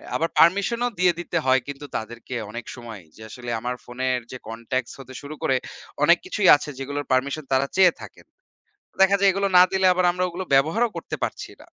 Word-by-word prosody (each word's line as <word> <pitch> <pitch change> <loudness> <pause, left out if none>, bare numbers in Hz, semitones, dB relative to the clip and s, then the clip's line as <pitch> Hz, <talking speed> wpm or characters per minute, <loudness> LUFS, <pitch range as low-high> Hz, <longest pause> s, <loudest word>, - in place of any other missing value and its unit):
আবার 165 - 0
পারমিশন 200 +7 +4
ও - - -2
দিয়ে 180 -1 +4
দিতে 175 0 -3
হয় 130 0 +4
কিন্তু 140 +1 -7
তাদেরকে 120 +3 -7 0.2
অনেক 120 0 -7
সময় 115 -5 -10
যে 110 - -16
আসলে 120 0 -8
আমার 125 +2 -3
ফোনের 125 +1 -2
যে 130 - -6
কনট্যাক্ট 115 +2 -4
হতে 130 -1 -11
শুরু 145 +2 -8
করে 130 - +2 0.5
অনেক - - +6
কিছুই 210 - 0
আছে 145 - -5
যেগুলোর 145 +2 -4
পারমিশন 140 +4 0
তারা 135 +1 +2
চেয়ে 185 -3 +6
থাকেন। - - -13 0.8
দেখা 195 +1 +6
যায় 200 -1 +5
এগুলো 195 +1 0
না 180 - +9
দিলে 190 -1 +1
আমরা 180 0 +1
ওগুলো 180 +2 -5
ব্যবহারও 165 +13 +3
করতে - - -5
পারছি - - -4
না। - - -15
145 Hz, 195 wpm, -23 LUFS, 130-180 Hz, 0.8 s, না